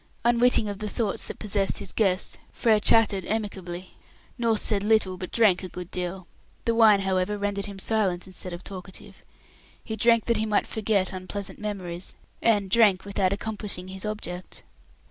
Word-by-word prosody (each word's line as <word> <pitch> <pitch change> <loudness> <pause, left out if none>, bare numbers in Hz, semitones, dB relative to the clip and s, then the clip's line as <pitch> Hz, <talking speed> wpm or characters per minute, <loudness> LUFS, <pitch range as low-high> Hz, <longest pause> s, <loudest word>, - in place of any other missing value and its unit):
Unwitting 240 -2 +4
of 200 -1 -5
the 215 -1 -3
thoughts 215 -4 -1
that - - -6
possessed 200 -2 0
his - - -4
guest, 190 -4 +1
Frere 225 -3 +3
chatted 205 -3 +3
amicably. 190 -4 -4 0.4
North 230 -3 +1
said 205 -3 0
little, 210 -3 +3
but 185 0 -7
drank 215 -6 +4
a 185 - -6
good 180 0 -8
deal. 180 0 -4 0.4
The 230 - +2
wine, 220 -3 +6
however, 190 +1 0
rendered 200 -1 -2
him 200 -1 -8
silent, 190 -3 0
instead 185 -1 -4
of 175 +1 -7
talkative. 190 -1 -8 0.7
He 220 - -4
drank 230 +1 +4
that 235 - +2
he 220 - 0
might 210 -1 +2
forget 205 -4 0
unpleasant 185 +1 -5
memories, 185 -4 -5 0.3
and 205 -4 +2
drank 205 -5 +5
without 195 -2 +1
accomplishing 200 -3 -3
his 190 0 -3
object. 185 -4 -5
200 Hz, 165 wpm, -26 LUFS, 185-220 Hz, 0.7 s, wine